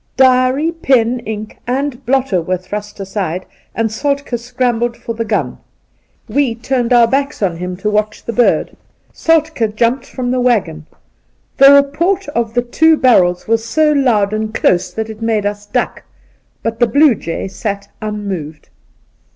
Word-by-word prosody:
Diary, 260 +4 +3
pen, 250 -7 +1
ink 215 -1 -6
and 270 +1 -2
blotter 255 -8 +1
were 185 +2 -1
thrust 205 +3 -7
aside, 190 -2 -3 0.3
and 225 -1 0
Soltk6 280 0 -2
scrambled 240 -1 -1
for 230 - -5
the 230 0 -3
gun. 225 - -2 0.7
We 275 -5 0
turned 245 0 -1
our 240 -1 +6
backs 275 0 -1
on 175 -4 0
him 180 +1 -5
to 210 +3 -2
watch 210 0 -1
the 235 - -3
bird. 245 +1 +2 0.4
Soltk^ 315 -9 +1
jumped 235 +4 0
from 245 -2 -3
the 255 - 0
waggon. 180 -11 0 0.7
The 275 0 +8
report 300 +7 +2
of 235 -4 -2
the 245 - +2
two 320 +6 +3
barrels 180 -10 +3
was 225 0 +1
so 305 +6 +2
loud 230 -8 +2
and 215 0 -2
close 180 0 +2
that 220 +4 -4
it 220 0 -10
made 220 -2 0
us 205 0 -3
duck; - - -2 0.6
but 225 0 -3
the 240 - +4
blue 285 +4 +5
jay 170 -3 -5
sat 200 +1 -4
unmoved. 195 -8 -5
230 Hz, 160 wpm, -16 LUFS, 205-260 Hz, 0.7 s, The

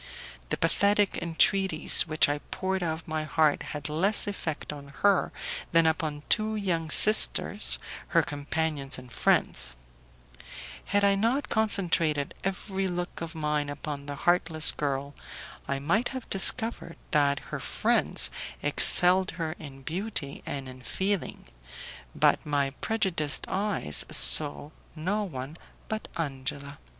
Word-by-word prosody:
The - - -1
pathetic 200 +4 +2
entreaties 170 0 +4
which 155 0 +3
I 145 +1 -2
poured 190 0 -3
out 165 -2 -1
of 160 - -14
my 155 -1 -3
heart 155 -1 +1
had 150 -1 -5
less 180 +8 +3
effect 175 -7 -5
upon 145 -1 -10 0.2
her 200 -2 +3 0.4
than 165 0 +4
upon 155 -2 -1
two 215 0 +1
young 170 -6 -2
sisters, 215 +6 +4 0.3
her - - +2
companions 145 -1 -2
and 125 -1 -13
friends: 65 - 0 1.1
had 205 0 0
I 200 0 +4
not 230 +8 -1
concentrated 170 -9 +1
every 195 0 -3
look 175 -1 -5
of 165 -1 -7
mine 150 -2 -2
upon 145 0 -7
the 145 - -5
heartless 165 0 +1
girl, 140 -1 -4 0.5
I 140 - -2
might 170 - 0
have 260 -3 -7
discovered 220 -2 0
that 140 -2 +2 0.2
her - - -3
friends - - +1 0.3
excelled 180 +5 +5
her 165 -2 -3
in 135 -3 -11
beauty 170 -3 -4
and 135 -2 -5
in 130 0 -11
feeling, 190 - -3 0.7
but - - +2
my 140 -2 -1
prejudiced 170 -6 -1
eyes 195 - 0
saw 145 - +6 0.2
no 190 +7 -2
one 140 -2 -8 0.3
but 220 0 -5
Angela. 140 -1 -5
160 Hz, 130 wpm, -27 LUFS, 145-195 Hz, 1.1 s, saw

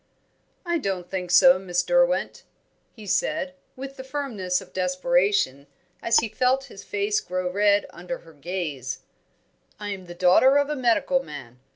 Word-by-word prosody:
"I 345 -1 0
don't 190 - -3
think 180 -2 -3
so, 265 +9 +7
Miss 180 -2 -1
Derwent," - - +1 0.5
he 220 -3 -11
said, 275 +7 -1 0.2
with 275 +1 -8
the 260 - -7
firmness 245 -10 -2
of 190 -2 -14
desperation, 180 -5 +1 0.3
as 230 0 +3
he 230 - -2
felt 255 +4 +1
his 195 - -11
face 205 +1 0
grow 185 0 -3
red 205 +1 +3
under 180 +10 -6
her 165 -1 -17
gaze. 145 -5 -4 0.8
"I 205 -1 -5
am 190 -2 -6
the 175 - -9
daughter 185 +10 +5
of 285 +1 +1
a - - -1
medical 260 +1 +2
man. 125 - -10
195 Hz, 160 wpm, -25 LUFS, 180-260 Hz, 0.8 s, so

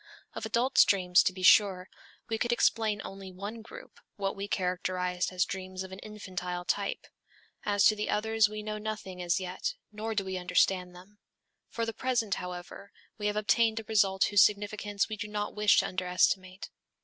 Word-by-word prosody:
_ - - -26 0.3
Of 220 - -5
adults' 240 +4 +4
dreams, 180 -2 +4
to - - +1
be 185 0 -8
sure, 190 -1 +5 0.4
we 225 -1 -2
could 240 - 0
explain 220 -3 +1
only 195 -1 -8
one 205 +5 -7
group, 485 - -13 0.2
what 195 -1 -2
we 200 0 -5
characterized 180 -1 -1
as 180 -1 +1
dreams 185 0 -6
of 190 - -10
an 190 - -8
infantile 180 -4 -6
type. 200 +2 -2 0.6
As 205 -1 +3
to 215 - +6
the 210 0 -3
others 220 0 +2
we 215 0 -6
know 215 0 -4
nothing 210 -4 -5
as 175 +2 +1
yet, 185 0 -4 0.2
nor 220 +1 -4
do 200 -2 0
we 190 -1 -3
understand 180 0 +1
them. 195 +4 -16 0.5
For 230 - -2
the 225 - -4
present, 235 -3 0
however, 180 +2 -8 0.3
we 210 - -1
have 210 - -1
obtained 220 +2 +2
a - - -7
result 195 -3 +2
whose 205 -2 +4
significance 205 -1 +1
we 215 - -5
do 210 - -5
not 210 0 -3
wish 210 -1 +4
to - - +4
under 185 0 -3
estimate. 185 +1 0
200 Hz, 190 wpm, -29 LUFS, 185-215 Hz, 0.6 s, to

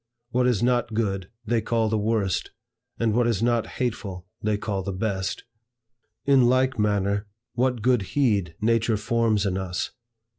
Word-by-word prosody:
What 125 +1 +2
is 120 -3 +2
not 120 -2 +1
good 95 -4 -1 0.2
they 115 +1 +1
call 115 0 +1
the 110 - 0
worst, 105 -3 0 0.5
and 115 -2 +2
what 120 +1 +3
is 115 -2 0
not 120 -1 +2
hateful, 100 -7 -3 0.2
they 105 -1 +1
call 100 -2 -2
the 100 +1 -3
best. 95 -1 -2 0.8
In 135 -3 +5
like 130 -1 +2
manner, 100 0 +1 0.3
what 125 -2 0
good 125 -2 +3 0.2
heed, 100 -11 +2
nature 115 0 +2
forms 110 -1 +1
in 95 -1 0
us! 90 -1 -3
110 Hz, 155 wpm, -25 LUFS, 100-120 Hz, 0.8 s, In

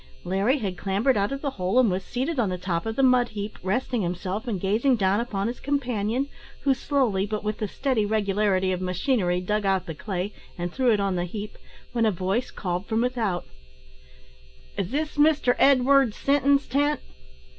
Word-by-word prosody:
Larry 195 +9 +1
had 195 -8 -4
clambered 205 +7 +1
out 200 +3 +1
of 275 0 -4
the 280 - -1
hole, 185 +6 +1
and 235 -6 +4
was 185 +1 -2
seated 265 - -2
on 220 -5 +2
the 180 - -2
top 180 +1 -2
of 225 - -2
the 270 - +1
mud 250 -2 +5
heap, 210 0 -6
resting 225 +5 -1
himself 185 +5 -3
and 210 -6 -1
gazing 220 +8 +2
down 195 -1 +2
upon 205 -5 -2
his 235 +3 -3
companion, 250 -3 -1 0.3
who 275 -1 +3
slowly, 250 -8 0
but 215 0 -3
with 215 0 -2
the 215 - -1
steady 255 0 0
regularity 200 -2 +1
of 180 0 -2
machinery, 180 -1 0
dug 210 +3 -1
out 190 -2 +1
the 165 - -5
clay, 190 +4 -4 0.2
and 175 0 -4
threw 255 -3 +2
it 210 - +2
on 195 -2 0
the 175 - -1
heap, 210 +4 -6 0.4
when 230 -2 +2
a - - +3
voice 190 +6 -1
called 180 0 -4
from 225 0 +1
without 230 -8 -1 1.3
"Is 190 -2 -2
this 300 +4 -2
Mr 295 -4 +4
Edward 270 -3 +5
Sinton's 280 0 +2
tent?" 290 +3 +1
215 Hz, 190 wpm, -25 LUFS, 190-255 Hz, 1.3 s, mud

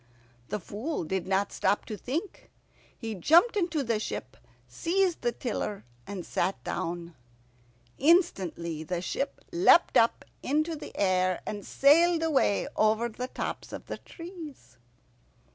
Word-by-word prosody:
The 210 - -2
Fool 220 - -4
did 185 +2 -2
not 195 +1 +1
stop 205 - +1
to 215 - -5
think. 300 - -5 0.5
He 225 -2 -5
jumped 330 - +5
into 340 -7 0
the 230 -3 0
ship, 130 -10 -5 0.3
seized 345 - 0
the 240 - +1
tiller, 215 -4 -4 0.2
and 190 -4 -6
sat 195 - -1
down. 170 0 -4 0.9
Instantly 190 - +2
the 175 +2 -3
ship - - -3
leapt 345 0 +5
up 230 - +3 0.2
into 310 +4 0
the 295 - -10
air, 185 -2 +2
and 205 -1 -5
sailed 325 - +4
away 280 -10 +2
over 220 +2 +2
the 250 +3 -5
tops - - -5
of - - -7
the - - -6
trees. 315 - -11
230 Hz, 135 wpm, -28 LUFS, -, 0.9 s, jumped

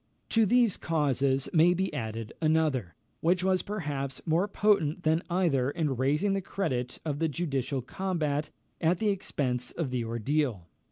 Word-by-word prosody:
To 225 -2 +3
these 240 -1 +4
causes 140 -4 +1
may 175 +2 +5
be 190 -1 -1
added 115 -4 -4
another, 155 - +1 0.2
which 180 +2 +2
was 185 -1 +2
perhaps 145 -10 -4
more 170 +5 +2
potent 195 -6 +2
than 160 +1 +2
either 165 -8 +2
in 150 -3 -1
raising 150 +10 +1
the 195 - 0
credit 125 -11 -3
of 145 -2 -2
the 165 - +2
judicial 140 -4 -2
combat 155 -2 -2 0.3
at 170 +2 +3
the 215 +2 +1
expense 135 -10 -1
of 155 -7 -3
the 125 -2 -1
ordeal. 115 - -1
155 Hz, 155 wpm, -29 LUFS, 135-180 Hz, 0.3 s, may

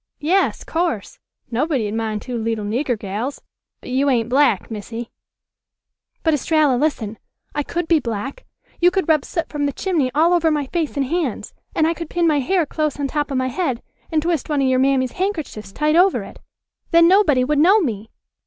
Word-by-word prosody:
"Yas, 365 +6 +1
course; 330 - -2 0.3
nobody'd 245 -4 0
mind 220 -2 -2
two 250 - -5
leetle 225 -2 -2
nigger 245 +3 -1
gals. 210 +7 -4 0.4
But - - -9
you 275 +2 +2
ain't 235 -3 +1
black, 255 -6 +2
Missy." 225 +2 -6 1.1
"But, 320 - +3
Estralla, 300 -1 +2
listen. 240 -6 -1 0.3
I 295 - 0
could 340 +3 -3
be 330 -2 +4
black. 245 - -5 0.4
You 350 - +6
could 370 -2 -1
rub 310 -4 +3
soot 335 -2 -3
from 290 -1 -1
the - - -1
chimney 320 -6 0
all 330 +4 +4
over 335 -2 +3
my 300 -2 0
face 310 0 -3
and 275 - +1
hands. 310 -4 -2 0.2
And 315 - +3
I 330 - +2
could 335 -1 -7
pin 345 -1 0
my 305 -3 +3
hair 345 +5 +1
close 305 -1 -2
on 280 - 0
top 295 +1 -1
of 270 - -1
my 255 0 0
head 260 -4 -2 0.3
and 310 -2 +1
twist 330 -4 -1
one 290 -2 +1
of - - +2
your 260 0 +2
mammy's 260 -1 +2
handkerchiefs 315 - -4
tight 300 +8 +1
over 365 +2 +4
it. - - -12 0.5
Then 335 0 +6
nobody 345 -9 +4
would 290 +3 +1
know 380 +8 +6
me." 225 - -3
290 Hz, 195 wpm, -20 LUFS, 245-330 Hz, 1.1 s, You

